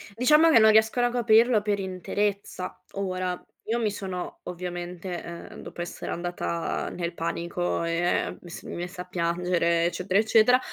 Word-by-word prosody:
Diciamo 300 +7 +5
che 230 - +7
non 220 - +7
riescono 220 +3 +4
a 240 - -2
coprirlo 230 -1 +4
per 205 -1 0
interezza. 190 0 -3
Ora, 185 -2 -2 0.2
io 230 +2 -1
mi 220 -3 +1
sono 190 -3 -5
ovviamente, 175 0 -5
ehm, 170 0 -9
dopo 175 - -8
essere 175 - -5
andata 175 -1 -2
nel 170 -1 -4
panico, 170 +1 -2
ehm, 170 +1 0
mi 175 - -12
s - - -8
mi - - -7
messa 180 +1 -5
a - - -21
piangere, 170 -1 +1
eccetera, 185 +3 +1
eccetera, 225 +3 +5
180 Hz, 155 wpm, -26 LUFS, 175-215 Hz, 0.2 s, che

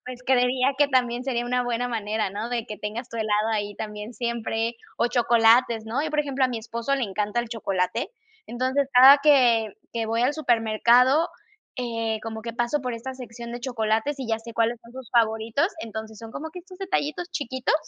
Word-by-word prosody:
pues 250 -1 -8
creería 255 +1 +3
que 290 0 +4
también 245 -2 +1
sería 240 -3 -1
una 250 0 +1
buena 245 0 -1
manera, 215 -3 -2
¿no? 210 +4 -4
De 240 -2 -2
que 210 - -6
tengas 220 +5 -5
tu 230 - -8
helado 215 0 +1
ahí 205 -1 -2
también 210 +1 -6
siempre, 235 0 -2 0.2
o 235 - +2
chocolates, 235 -1 +4
¿no? 245 +6 -1
Yo, 310 - -2
por 300 - -2
ejemplo, 275 -2 0
a 255 - +2
mi 240 - -3
esposo 235 +4 -2
le 265 - 0
encanta 210 +2 -2
el 235 - -6
chocolate, 195 -5 -2 0.4
entonces, 260 +3 0
cada 265 +3 +9
que 240 -7 +4 0.2
que 230 -1 -2
voy 230 +1 0
al 270 +4 +2
supermercado, 245 +2 +3 0.5
eh, 230 -3 -2
como 220 -1 -6
que 230 0 -5
paso 240 +5 0
por 250 -2 -3
esta 245 +3 -6
sección 235 -2 -9
de 240 - -5
chocolates 235 +2 -1
y 265 - -4
ya 225 0 0
sé 230 0 -10
cuáles 230 +1 +1
son 235 +1 -16
sus 260 -3 -10
favoritos, 225 +5 +2
entonces, 220 -2 -7
son 225 0 -10
como 315 +2 -6
que 360 - -9
estos 365 +1 -13
detallitos 350 -3 -2
chiquitos, 260 -4 -1
235 Hz, 200 wpm, -25 LUFS, 225-260 Hz, 0.5 s, cada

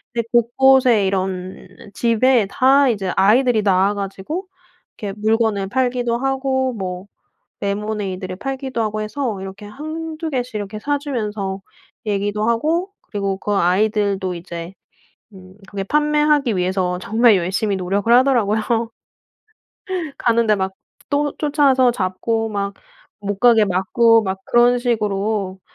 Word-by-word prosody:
이제 235 - 0
곳곳에 240 -2 +4
이런 190 -1 -3 0.3
집에 235 0 +2
다 270 +4 +4
이제 195 -5 -1
아이들이 220 +3 +4
나와 195 +1 +3
가지고 200 - -5 0.5
이렇게 205 -3 -5
물건을 215 -2 +1
팔기도 245 0 0
하고 265 -1 -1
뭐 185 -2 -5 0.6
레모네이드를 200 -2 -3
팔기도 265 +1 -4
하고 215 0 -2
해서 220 -2 -3
이렇게 195 +2 -8
한두 315 +6 -6
개씩 250 -3 -3
이렇게 210 0 -4
사주면서 215 -9 -3 0.5
얘기도 205 +2 -1
하고 320 - 0
그리고 200 -2 -3
그 205 - -3
아이들도 195 0 +1
이제 170 0 -7 0.6
음 185 0 -14
그게 200 -1 -4
판매하기 295 -2 +2
위해서 180 0 -1
정말 225 +1 +4
열심히 195 +4 -1
노력을 195 +4 -1
하더라고요. 240 -5 +3 1.6
가는데 230 -2 +2
막 190 -1 -2 0.4
또 290 0 0
쫓아와서 280 -4 +3
잡고 225 +2 -2
막 200 -1 -3 0.5
못 200 -1 -3
가게 230 -2 +5
막고 225 +5 +3
막 190 -2 -3
그런 240 +1 +4
식으로 210 -4 -1
215 Hz, 280 characters per minute, -20 LUFS, 195-250 Hz, 1.6 s, 가게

